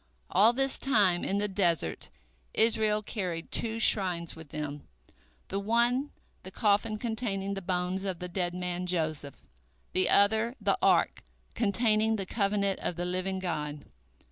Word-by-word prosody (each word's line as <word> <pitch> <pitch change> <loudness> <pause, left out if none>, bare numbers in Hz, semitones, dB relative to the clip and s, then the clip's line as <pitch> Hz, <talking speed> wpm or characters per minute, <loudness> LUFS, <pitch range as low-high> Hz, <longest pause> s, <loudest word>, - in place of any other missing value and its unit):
" 60 - -39
All 210 +5 +6
this 270 +2 +1
time 200 -10 +2
in 195 - 0
the 205 +1 0
desert 170 - -1 0.5
Israel 220 -1 +2
carried 180 -6 -4
two 225 0 -2
shrines 180 -6 +3
with 160 -2 -12
them, 145 -1 -6 0.6
the 195 - -2
one 240 +6 +2 0.3
the 185 - -9
coffin 210 +2 +1
containing 210 -4 -2
the 195 - -5
bones 180 +1 -2
of 190 -3 -3
the 180 - -6
dead 175 0 -2
man 180 0 -3
Joseph, 155 -5 -3 0.5
the 185 0 +2
other 220 +4 +3
the - - +1
Ark - - +3 0.3
containing 220 0 +2
the 195 -3 -3
covenant 200 -1 0
of 175 - -3
the 175 +1 -3
Living 185 +1 -2
God. 150 -5 -4
195 Hz, 150 wpm, -29 LUFS, 175-215 Hz, 0.6 s, All